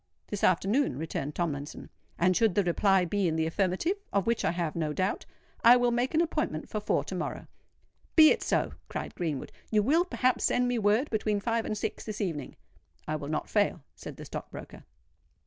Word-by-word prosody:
"This 205 Hz, -, -4 dB
afternoon," 195 Hz, -, +2 dB
returned 150 Hz, -2 st, -4 dB
Tomlinson; 150 Hz, -4 st, -4 dB, 0.3 s
"and 185 Hz, +1 st, +3 dB
should 220 Hz, -3 st, +3 dB
the 205 Hz, -, +3 dB
reply 190 Hz, +1 st, +3 dB
be 195 Hz, +2 st, 0 dB
in 160 Hz, -, 0 dB
the 160 Hz, 0 st, +1 dB
affirmative—of 200 Hz, -, -1 dB
which 235 Hz, 0 st, 0 dB
I -, -, +2 dB
have 170 Hz, -2 st, -2 dB
no 155 Hz, -3 st, -1 dB
doubt—I 205 Hz, +6 st, +2 dB
will 245 Hz, -1 st, +2 dB
make 245 Hz, +5 st, 0 dB
an 320 Hz, -, +4 dB
appointment 305 Hz, -, -2 dB
for 215 Hz, -, -3 dB
four 210 Hz, -, 0 dB
to -, -, -7 dB
morrow." -, -, -4 dB, 0.7 s
"Be 310 Hz, -2 st, +9 dB
it -, -, +1 dB
so," -, -, 0 dB, 0.2 s
cried -, -, -5 dB
Greenwood. 155 Hz, -6 st, -3 dB, 0.2 s
"You 210 Hz, -1 st, +3 dB
will, 315 Hz, +9 st, +3 dB
perhaps, 255 Hz, -8 st, +1 dB
send 250 Hz, 0 st, +2 dB
me 245 Hz, -1 st, 0 dB
word 215 Hz, +7 st, +2 dB
between 210 Hz, -2 st, 0 dB
five 230 Hz, +2 st, -1 dB
and 215 Hz, -, -2 dB
six -, -, -4 dB
this 215 Hz, -1 st, -6 dB
evening." 165 Hz, -9 st, -3 dB, 0.5 s
"I 155 Hz, -, -1 dB
will 145 Hz, -1 st, -5 dB
not 155 Hz, -, -2 dB
fail," 205 Hz, -7 st, +1 dB
said -, -, -10 dB
the -, -, -9 dB
stock -, -, -7 dB
broker. -, -, -10 dB
205 Hz, 195 wpm, -29 LUFS, 165-235 Hz, 0.7 s, Be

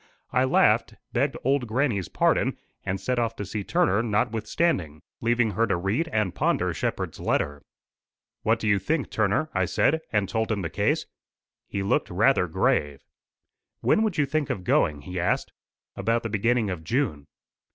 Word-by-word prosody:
I 125 Hz, -, +3 dB
laughed, 130 Hz, -, +3 dB, 0.2 s
begged -, -, +1 dB
old 135 Hz, -1 st, +1 dB
grannie's 110 Hz, -, 0 dB
pardon, -, -, +1 dB, 0.3 s
and 95 Hz, +1 st, -2 dB
set 125 Hz, +6 st, -1 dB
off 115 Hz, -1 st, -1 dB
to 105 Hz, -, -5 dB
see 100 Hz, +2 st, -4 dB
Turner 100 Hz, +2 st, +2 dB
notwithstanding, 110 Hz, -, 0 dB, 0.2 s
leaving 120 Hz, -1 st, +2 dB
her 115 Hz, +2 st, +1 dB
to 95 Hz, -, +1 dB
read 100 Hz, -, 0 dB
and 110 Hz, -, 0 dB
ponder -, -, +1 dB
Shepherd's -, -, -3 dB
letter. 75 Hz, 0 st, -1 dB, 0.8 s
"What 115 Hz, +1 st, +2 dB
do 110 Hz, -, -3 dB
you 100 Hz, -1 st, +3 dB
think, 145 Hz, -, -1 dB
Turner?" 110 Hz, +9 st, +1 dB
I -, -, +1 dB
said, 160 Hz, +3 st, +2 dB
and 105 Hz, -3 st, +1 dB
told 110 Hz, +2 st, -1 dB
him 100 Hz, -3 st, -1 dB
the 80 Hz, -, -3 dB
case. -, -, +1 dB, 0.6 s
He 100 Hz, -, -3 dB
looked 95 Hz, -, +1 dB
rather -, -, +3 dB
grave. 70 Hz, -2 st, 0 dB, 0.8 s
"When -, -, +3 dB
would 215 Hz, -5 st, 0 dB
you 150 Hz, -, +3 dB
think 150 Hz, 0 st, -1 dB
of 90 Hz, -, -3 dB
going?" 75 Hz, -4 st, +2 dB
he 90 Hz, +2 st, -5 dB
asked. 90 Hz, -, 0 dB, 0.4 s
"About 115 Hz, +4 st, 0 dB
the 115 Hz, -, -3 dB
beginning 110 Hz, 0 st, +1 dB
of 85 Hz, -3 st, -5 dB
June." 85 Hz, -, -1 dB
110 Hz, 170 wpm, -26 LUFS, 95-125 Hz, 0.8 s, I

